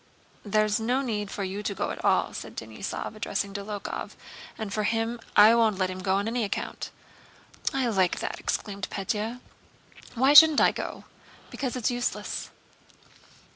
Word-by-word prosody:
"There's 215 +1 +2
no 250 +5 0
need 210 -5 -2
for 200 - -4
you 195 +2 -4
to 205 -1 -3
go - - -2
at - - -7
all," - - +2
said - - -8
Denísov, - - -5
addressing 200 -1 -3
Dólokhov, 205 0 -5 0.4
"and 220 -2 -4
as - - -7
for 215 - 0
him, 225 +2 -1 0.2
I 215 +2 +8
won't 225 -4 +3
let 185 -1 0
him 185 0 -6
go 190 +1 +1
on 200 +2 0
any 235 +1 0
account." 205 - -4 0.8
"I 265 -2 0
like 190 -5 +2
that!" - - -4
exclaimed 200 -2 -3
Pétya. 220 +4 -3 0.7
"Why 265 +4 +4
shouldn't 310 0 +9
I - - +5
go?" - - -6 0.5
"Because 260 -3 -3
it's 250 -1 0
useless." 245 0 -3
215 Hz, 165 wpm, -27 LUFS, 200-240 Hz, 0.8 s, shouldn't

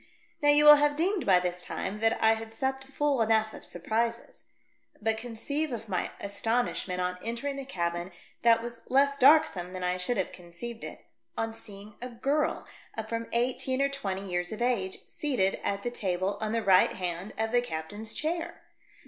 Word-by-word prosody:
Now 290 - +4
you 295 +1 +6
will 295 0 +11
have 290 0 +2
deemed 360 +4 0
by 185 -2 +6
this 180 0 -2
time 195 +3 -4
that 225 0 +2
I 220 0 +6
had 225 0 -6
supped 265 +3 -2
full 275 -1 0
enough 220 -1 +2
of - - -10
surprises. 230 +6 -2 0.5
But 220 +1 +1
conceive 245 +7 -3
of 230 -2 -5
my 185 -3 -1
astonishment 200 -2 -1
on 180 0 -1
entering 235 +5 -3
the 275 -1 -6
cabin, 175 -5 -2 0.3
that 230 -1 +5
was 235 -1 -7
less 280 +1 +3
darksome 255 - +5
than 185 -1 -5
I 180 0 +1
should 210 +7 0
have 190 - 0
conceived 185 +7 -9
it, - - -8 0.3
on 225 0 -1
seeing 210 -1 -10
a 250 - -4
girl 275 +6 +1
of - - -6
Il6 - - -12
THE - - -20
DEATH 220 - -3
SHIP. 220 - -14
from 230 0 -3
eighteen 255 +2 0
to 275 +1 +2
twenty 200 -9 -3
years 175 -1 -2
of 220 - -5
age, 195 -7 -1
seated 245 -11 0
at 200 0 -1
the 240 - -2
table 190 -3 -1
on 215 -1 -1
the 230 0 0
right 190 -2 +5
hand 180 +2 -4
of 220 0 -1
the 245 0 +4
captain's 205 +2 -5
chair 330 +2 -3
225 Hz, 200 wpm, -29 LUFS, 190-260 Hz, 0.5 s, will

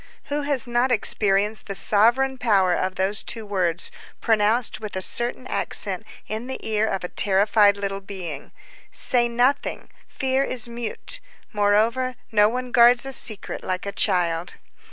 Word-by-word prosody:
Who 290 +1 -1
has 285 -3 +2
not 240 +1 0
experienced 210 -2 +1
the 200 - -3
sovereign 240 +7 +2
power 195 -7 +2
of 185 +1 -2
those 195 +2 +1
two 225 -2 -3
words, 180 -4 -1 0.3
pronounced 220 +1 +1
with 215 -2 -7
a - - -1
certain 240 +4 -2
accent - - 0 0.2
in 220 +3 -5
the 265 - -5
ear 220 0 0
of 195 - -3
a - - -3
terrified 205 +2 +3
little 195 -1 -4
being: 180 -7 -8 0.4
_Say 240 -1 +2
nothing! 250 +4 0 0.3
_ - - -28
Fear 265 0 0
is 245 -2 +1
mute. 235 - -4 0.3
Moreover, 220 +5 +1 0.2
no 210 -1 +4
one 250 +1 -5
guards 240 +1 +6
a 270 - -5
secret 220 -5 +1
like 185 +1 -3
a 200 - -3
child. 175 -4 0
215 Hz, 155 wpm, -23 LUFS, 195-245 Hz, 0.4 s, guards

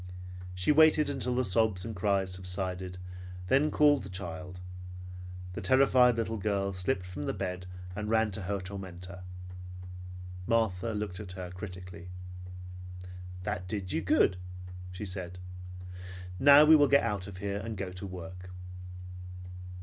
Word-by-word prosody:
She 90 +10 +3
waited 155 -1 +6
until 125 -2 0
the 130 0 +3
sobs 105 -1 +3
and 115 -1 -4
cries 95 -1 +2
subsided, 90 0 -2
and 90 0 -9
then 140 +6 +5
called 145 -2 +5
the 95 - -7
child. 90 -1 -5 0.9
The - - -4
terrified 125 +2 +6
little 115 0 0
girl 100 -1 +1
slipped 90 +1 0
from 90 -5 -5
the - - -1
bed 90 -1 -3 0.3
and 105 +1 -2
ran 110 -1 +4
to 95 - -3
her 100 +2 -1
tormentor. 90 -1 -6 1.3
Martha 115 -2 +2
looked 105 -3 -2
at 95 -4 -6
her 90 -1 -5
critically. 90 -2 -7 1.4
"That 90 0 -2
did 95 -1 -2
you - - +2
good," 90 - +4 0.5
she 90 +3 -5
said. 90 -2 -4 1.0
"Now 145 +2 +10
we 160 +1 +10
will 145 -2 +7
get 140 +1 +6
out 100 -5 -1
of 100 -2 -7
here, 100 +1 -1
and 110 0 -4
go 95 -1 -3
to 90 +2 -5
work." 90 0 -7
95 Hz, 145 wpm, -31 LUFS, 90-110 Hz, 1.4 s, Now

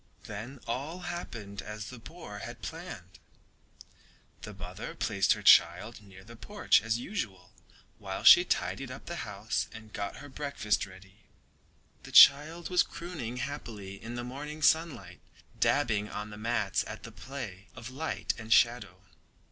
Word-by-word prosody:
Then 115 +7 -7
all 140 +10 -4
happened 115 - -6
as 105 +2 -7
the 125 - -10
boar 115 -6 -9
had 120 +3 -8
planned. 125 - -8 1.2
The - - -7
mother - - -7
placed - - +2
her - - -8
child 110 +4 +5
near 95 -2 -14
the 115 +3 -12
porch 205 - +2
as 115 +1 0
usual 105 - -5 0.5
while - - -5
she - - +10
tidied 95 +9 -1
up 130 +1 -9
the 170 - -5
house 105 +2 -2
and 110 -1 -12
got 100 -1 -4
her 145 - -10
breakfast 130 -8 -1
ready. 95 +2 -16 0.8
The - - -11
child 160 +5 +7
was 180 -1 +5
crooning 155 -12 -5
happily 115 -7 -6
in 115 +1 -6
the 120 - -4
morning 150 +5 -6
sunlight, 135 - +2 0.4
dabbing 110 -7 +2
on 105 0 -6
the - - -8
mats 110 -3 0
at - - -8
the - - -9
play 110 -8 -8
of 115 +2 -8
light 155 +5 -2
and 110 0 -8
shadow. 105 -6 +3
115 Hz, 150 wpm, -30 LUFS, 100-140 Hz, 1.2 s, she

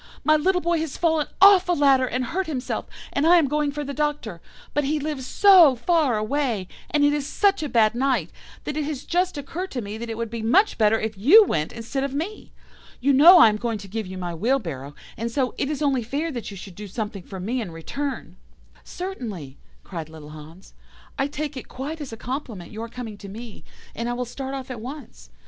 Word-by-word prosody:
My 310 - +5
little 360 +4 +2
boy 340 -1 +1
has 315 -4 -4
fallen 320 -3 +1
off 390 -2 +7
a - - +4
ladder 275 -4 +4
and 250 +1 -2
hurt 370 +7 -2
himself, 275 -5 -3 0.3
and 285 +3 +2
I 350 - +7
am 320 -4 +3
going 295 +1 0
for 295 +1 -4
the 280 0 -5
Doctor. 290 - -2 0.3
But 295 - +1
he 300 +2 0
lives 290 -3 -4
so 365 -9 +7
far 285 -2 +2
away, 220 -3 -1 0.2
and 295 -1 +3
it 290 - +3
is 295 -1 -2
such 395 0 +2
a 300 - -3
bad 220 -3 +3
night, 245 - 0 0.3
that 295 - -4
it 305 - -1
has 290 -3 -4
just 360 -1 0
occurred 335 +7 -5
to 250 - -4
me 205 +2 -6
that 235 0 -6
it 225 - -4
would 230 -1 -4
be 230 -1 -4
much 355 - +3
better 220 0 +4
if 220 0 -3
you 385 - +8
went 155 - -1
instead 235 +4 -4
of 275 0 -3
me. 355 +9 -5 0.5
You 275 +3 +2
know 330 +7 +9
I 315 - +8
am 210 - -1
going 230 0 -2
to 200 -1 -10
give 215 +1 -4
you 185 0 -7
my 175 -2 -4
wheelbarrow, 165 - -2 0.2
and 230 +2 -2
so, 255 0 0
it 275 - 0
is 300 0 -2
only 275 -3 +2
fair 285 +8 -3
that 240 -5 -5
you 200 - -9
should 190 0 -10
do 210 +3 -8
something 210 0 -5
for 190 +2 -9
me 235 +7 -2
in 210 - -5
return.' 270 - -5 0.5
"'Certainly,' 215 - -7 0.2
cried 165 -4 -7
little 155 -2 -11
Hans, 155 +4 -13 0.5
'I 270 - +2
take 295 0 -5
it 260 - -7
quite 300 +5 -6
as 280 - -6
a 225 - -7
compliment 240 - -6
your 225 +2 -6
coming 225 -4 -8
to 200 - -9
me, 225 +1 -10 0.3
and 235 +2 -3
I - - -1
will 250 +1 -3
start 265 +3 -6
off 265 -1 -6
at 235 -3 -6
once. 280 +5 -9
260 Hz, 230 wpm, -24 LUFS, 215-300 Hz, 0.5 s, know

